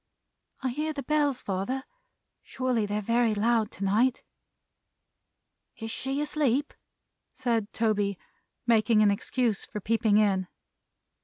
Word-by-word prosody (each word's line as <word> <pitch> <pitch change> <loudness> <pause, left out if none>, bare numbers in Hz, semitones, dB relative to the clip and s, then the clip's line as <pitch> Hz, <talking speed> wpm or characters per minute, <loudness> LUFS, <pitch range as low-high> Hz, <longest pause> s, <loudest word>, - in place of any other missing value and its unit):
"I 260 - +1
hear 305 +5 -2
the 280 -2 -5
Bells, 290 -2 +1
father. 200 +8 -2 0.6
Surely 250 -5 -1
they're 210 +1 -2
very 230 0 +2
loud 220 0 +2
to 200 - -6
night." 225 +6 +2 1.5
"Is 225 0 -5
she 270 +4 -2
asleep?" 295 -2 0 0.6
said 230 -4 -1
Toby, 205 -3 0 0.5
making 220 -2 +4
an 205 - +5
excuse 225 +1 -1
for 210 - -6
peeping 220 0 +2
in. 195 -3 +2
230 Hz, 115 wpm, -28 LUFS, 210-260 Hz, 1.5 s, an